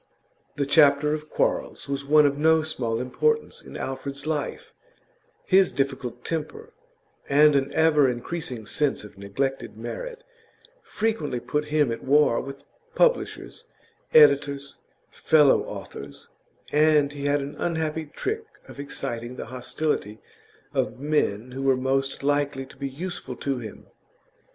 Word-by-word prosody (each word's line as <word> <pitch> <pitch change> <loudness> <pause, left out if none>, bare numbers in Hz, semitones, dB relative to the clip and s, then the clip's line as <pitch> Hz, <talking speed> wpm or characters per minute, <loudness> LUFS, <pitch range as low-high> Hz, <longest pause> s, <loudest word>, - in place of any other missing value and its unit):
The 140 - 0
chapter 145 0 +5
of 155 0 -5
quarrels - - -1
was 140 0 -3
one 150 +1 +5
of 140 -1 +2
no 160 +2 +3
small 115 -7 -2
importance 450 - 0
in - - -10
Alfred's 140 +2 -5
life; 155 -2 -3 0.7
his 190 0 +4
difficult 135 -3 -3
temper, 165 - -5 0.6
and 150 +1 +6
an 140 0 +1
ever 150 -4 +4
increasing 125 -1 -4
sense 145 +3 -1
of 105 -2 -13
neglected 135 +8 -3
merit, - - -6 0.6
frequently 210 - -2
put 150 +4 -2
him 150 -4 +1
at 115 - -5
war 145 -3 +4
with 140 0 -9 0.3
publishers, - - 0 0.5
editors, 140 -2 +4 0.3
fellow 150 -3 +4
authors, 70 0 -9 0.4
and 150 -1 +4
he 140 -1 -6
had 145 0 +2
an 140 +1 -6
unhappy 160 -1 -1
trick 440 - -4 0.2
of - - -12
exciting 120 -3 -5
the - - -6
hostility 125 -4 -2 0.6
of 125 - -1
men 130 -6 0
who 135 +2 -5
were 135 -1 +3
most 135 +1 -1
likely 145 -1 0
to 130 - -16
be 140 -1 -4
useful 160 -2 -6
to 135 -1 -2
him. 110 -4 -9
140 Hz, 135 wpm, -25 LUFS, 130-155 Hz, 0.7 s, and